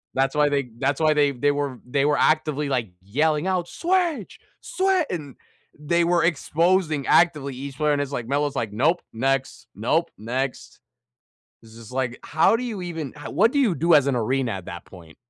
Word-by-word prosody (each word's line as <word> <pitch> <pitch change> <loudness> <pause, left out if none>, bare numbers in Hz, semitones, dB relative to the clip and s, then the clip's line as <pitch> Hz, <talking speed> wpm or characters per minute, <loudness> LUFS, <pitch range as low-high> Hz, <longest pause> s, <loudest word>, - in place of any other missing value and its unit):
That's 135 +2 +1
why 150 -1 +3
they 140 -3 -1
that's 140 +4 -1
why 155 -1 +4
they 145 -1 +3
they 145 +3 +1
were 140 -4 -3
they 135 +3 0
were 145 0 +2
actively 150 -2 +1
like 120 -6 -1
yelling 150 - 0
out, 180 -2 0
"Switch, 345 - -1 0.2
swi" 380 -6 +1
and 145 -7 -5 0.4
they 170 +3 +1
were 170 0 +2
exposing 165 -1 +1
actively 150 -6 +3
each 135 +1 -7
player, 150 -1 +2
and 145 - 0
it's 140 0 -4
like 120 -4 -4
Melo's 145 +1 -1
like, 110 -5 -2
"Nope, 155 +11 +1
next. 135 +3 -2
Nope, - - 0
next." 125 +5 -4 0.8
It's 110 0 -16
just 115 +1 -12
like, 130 -2 -2
how 160 +8 +3
do 250 - -5
you 220 -7 -4
even 165 -6 -5
ho 150 - -8
what 220 +4 +3
do 285 - -1
you 225 -11 +3
do 165 +3 +3
as 145 -2 +5
an 135 - +1
arena 125 +1 0
at 95 -2 -7
that 85 -3 -8
point? 85 -4 -15
145 Hz, 195 wpm, -23 LUFS, 130-170 Hz, 0.8 s, as